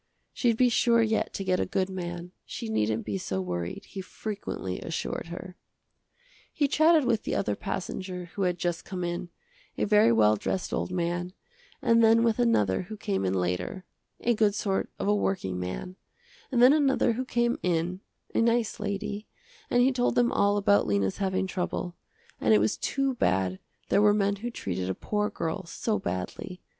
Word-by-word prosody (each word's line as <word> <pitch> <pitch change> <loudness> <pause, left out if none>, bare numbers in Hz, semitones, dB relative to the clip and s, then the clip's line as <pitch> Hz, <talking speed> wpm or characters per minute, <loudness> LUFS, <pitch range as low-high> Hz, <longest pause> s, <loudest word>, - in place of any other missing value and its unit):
She'd 235 -3 +1
be 255 - +5
sure 235 0 +4
yet 220 0 0
to 195 - -3
get 185 -1 +1
a - - +1
good 185 0 0
man, 175 -2 -5
she 230 -2 -6
needn't 110 - 0
be 100 -3 -2
so 95 0 -3
worried, 90 -1 -4
he 195 - -7
frequently 195 - -5
assured 165 0 -4
her. 180 +2 -8 0.9
He 290 - +1
chatted 310 0 +4
with 230 -3 +2
the - - -2
other 105 - 0
passenger 180 - -4
who 200 - -4
had 180 -2 +1
just 170 -1 -2
come 185 -2 -5
in, 175 0 -3 0.5
a - - 0
very 210 - +5
well 110 -2 +5
dressed 185 - -2
old - - -1
man, 175 0 -2 0.5
and 230 0 +5
then 225 +1 +6
with 230 0 +2
another 105 - +3
who 215 +4 -8
came 95 - -1
in 95 0 0
later, 90 - -2 0.4
a 240 - +3
good 210 -2 +2
sort 195 -2 -1
of - - -2
a 205 - +4
working 185 - -1
man, 90 - -5 0.5
and 245 -2 +4
then 255 +3 +8
another 270 -5 +3
who 250 +3 -2
came 240 -1 0
in, 175 +1 0 0.3
a - - +2
nice 230 -1 +1
lady, 205 +1 -3 0.4
and 245 0 +4
he 265 - +4
told 250 -1 +1
them 245 -1 +3
all 200 0 +3
about 205 0 +3
Lena's 100 -2 +1
having 190 -1 0
trouble, 180 -1 -3 0.4
and 110 0 +4
it - - +5
was 105 +1 +1
too 275 -1 0
bad 95 - +1 0.3
there 200 - +4
were 210 0 +5
men 200 -1 +1
who 235 +4 -4
treated 95 - -3
a 95 - -1
poor 210 0 -1
girl 165 +4 -3
so 215 +5 -1
badly. 90 - -5
190 Hz, 185 wpm, -28 LUFS, 160-225 Hz, 0.9 s, then